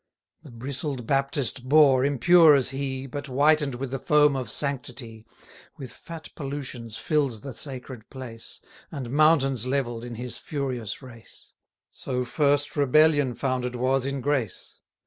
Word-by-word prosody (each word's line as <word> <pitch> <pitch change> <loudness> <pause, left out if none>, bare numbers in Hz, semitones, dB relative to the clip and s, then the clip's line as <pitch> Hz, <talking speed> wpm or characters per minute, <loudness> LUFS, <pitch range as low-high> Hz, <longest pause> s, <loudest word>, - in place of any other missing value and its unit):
The 150 - -14
bristled 130 +1 -4
Baptist 135 -1 0
Boar, 140 -3 +6
impure 155 +3 +6
as 130 -2 +2
he, 135 0 -4
But 145 +2 -6
whiten'd 145 +1 +3
with 130 +1 -5
the 135 - -3
foam 150 +1 +4
of 130 -4 -4
sanctity, 120 -4 -4 0.5
With 130 -3 -9
fat 165 -1 -10
pollutions 135 -6 -6
fill'd 135 -4 -1
the 135 - -6
sacred 130 -4 -7
place, 125 -4 -7 0.3
And 130 -6 -6
mountains 135 -5 +3
levell'd 125 -4 -2
in 120 -1 -7
his 120 +1 -6
furious 130 -6 -4
race; 120 -3 -14 0.4
So 125 -1 -2
first 145 +2 +1
rebellion 145 -2 +3
founded 125 0 -2
was 130 +2 +1
in 140 -1 -3
grace. 135 -6 -2
135 Hz, 140 wpm, -25 LUFS, 125-145 Hz, 0.5 s, Boar